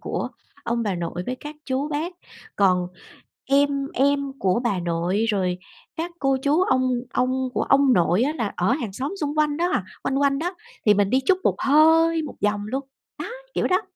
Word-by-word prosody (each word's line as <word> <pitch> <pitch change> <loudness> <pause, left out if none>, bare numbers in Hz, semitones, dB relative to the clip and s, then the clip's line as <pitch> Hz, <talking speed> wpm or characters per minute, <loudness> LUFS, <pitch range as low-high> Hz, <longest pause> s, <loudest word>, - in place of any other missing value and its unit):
của - - -3 0.4
ông 235 0 0
bà 200 -4 -1
nội 175 +1 -4
với 255 - -2
các 295 +3 -9
chú 270 +3 -1
bác. 310 +4 -2 0.4
Còn 185 -3 +3 0.6
em 275 0 +2
em 280 0 +1
của 190 +4 +1
bà 200 -6 +1
nội, 175 +5 0
rồi 185 -4 0 0.4
các 335 +2 -3
cô 270 -2 +2
chú 300 +5 +3
ông 255 -7 +2 0.2
ông 255 +1 0
của - - +1
ông 275 -1 +4
nội 175 +2 +3
á 290 - +1
là 220 -4 -2
ở 185 +7 +2
hàng 240 -8 -2
xóm 275 - -4
xung 290 0 -1
quanh 300 -1 +2
đó 350 +2 0
à, - - 0 0.2
quanh 270 - -1
quanh 275 -1 +2
đó, 355 +4 -2 0.3
thì 210 - +7
mình 200 0 +2
đi 260 +1 +3
chút 370 -1 +4
một - - +2
hơi 320 +3 +4
một 300 - -7
vòng 205 0 0
luôn, 265 +5 -2 0.4
đó, - - -4 0.3
kiểu - - +1
đó. 370 +3 +2
265 Hz, 200 wpm, -23 LUFS, 205-295 Hz, 0.6 s, thì